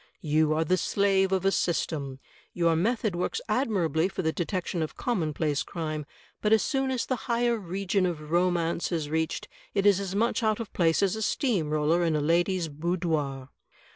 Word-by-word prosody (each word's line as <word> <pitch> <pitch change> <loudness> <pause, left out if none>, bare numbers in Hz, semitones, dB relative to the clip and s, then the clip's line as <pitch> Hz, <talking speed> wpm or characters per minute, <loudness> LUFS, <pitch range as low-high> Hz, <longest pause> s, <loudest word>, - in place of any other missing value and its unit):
You 155 0 +2
are 160 - +2
the 185 +4 +2
slave 195 0 +2
of 190 -1 0
a 195 - +4
system. 145 -7 -1 0.4
Your 170 -2 +3
method 215 +2 0
works 180 - -1
admirably 185 - +1
for 190 - -4
the 160 - +1
detection 175 -1 -2
of 155 - -4
com 240 -7 -1
monplace 150 -1 -1
crime, 155 -3 -4 0.3
but 210 - +1
as 220 -1 +5
soon 270 -2 0
as 255 -2 -1
the 260 - 0
higher 235 0 +2
region 195 -1 -1
of 155 -3 -5
romance 175 -1 +1
is 155 -4 -2
reached 160 0 -1 0.3
it 200 0 +1
is 200 -2 +5
as 195 -1 -4
much 230 +4 +1
out 215 -1 +1
of 225 -4 -6
place 165 +1 +2
as 195 0 +2
a 220 - -4
steam 210 - 0
roller 155 +3 +2
in 165 -2 +1
a - - +1
lady's 170 +3 +1
boudoir. 155 -4 -2
175 Hz, 190 wpm, -27 LUFS, 160-200 Hz, 0.4 s, as